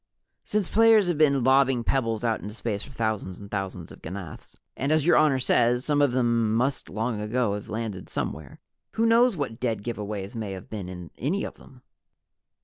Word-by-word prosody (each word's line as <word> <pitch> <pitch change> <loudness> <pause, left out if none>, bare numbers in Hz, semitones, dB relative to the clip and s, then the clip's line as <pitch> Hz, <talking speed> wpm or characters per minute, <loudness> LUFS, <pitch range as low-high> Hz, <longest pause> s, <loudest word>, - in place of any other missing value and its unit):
"Since 210 -3 -1
players 225 -3 +5
have 165 -4 -1
been 140 -4 +4
lobbing 130 -1 +4
pebbles 115 -3 0
out 115 -2 0
into 105 +1 -7
space 110 -4 -3
for - - -10
thousands 110 -6 -2
and 100 -1 -11
thousands 95 -4 -4
of - - -13
ganaths, 90 -2 -8 0.2
and 140 +4 -1
as 155 -2 +3
Your 175 - +5
Honor 150 -3 +4
says, 125 -1 +2
some 145 -1 +2
of 145 -3 +4
them 120 -3 +1
must 130 +4 0
long 110 +1 -2
ago 110 0 0
have 105 0 -6
landed 110 -4 -4
somewhere, 70 -3 -5 0.3
who 225 - +1
knows 230 -2 +4
what 130 -6 -3
dead 115 -5 -1
give 115 -2 -4
aways 100 -1 -5
may 110 -4 -4
have 95 - -10
been 100 -4 -5
in 90 -2 -8
any 170 - -1
of - - -5
them?" 130 -2 -17
115 Hz, 200 wpm, -26 LUFS, 105-140 Hz, 0.3 s, players